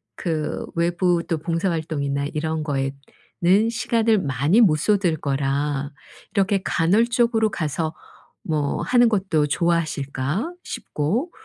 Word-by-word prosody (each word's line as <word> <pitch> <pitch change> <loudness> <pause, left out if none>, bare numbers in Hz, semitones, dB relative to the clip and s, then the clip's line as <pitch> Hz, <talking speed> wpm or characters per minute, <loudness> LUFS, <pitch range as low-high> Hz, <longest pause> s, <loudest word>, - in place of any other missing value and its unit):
그 160 -3 -3
외부 170 0 +1
또 165 -3 0
봉사 165 +4 -1
활동이나 140 -3 -2
이런 155 0 -2
거에는 145 +8 -1
시간을 230 -2 +1
많이 145 - +2
못 160 -8 +5
쏟을 180 0 +1
거라 140 0 -1 0.4
'이렇게 195 0 +2
간헐적으로 225 +6 +2
가서 155 -1 -2 0.5
뭐 150 -3 -1
하는 245 -1 +4
것도 190 -8 +1
좋아하실까?' 155 - -1
싶고 215 - -2
165 Hz, 245 characters per minute, -23 LUFS, 145-200 Hz, 0.5 s, 못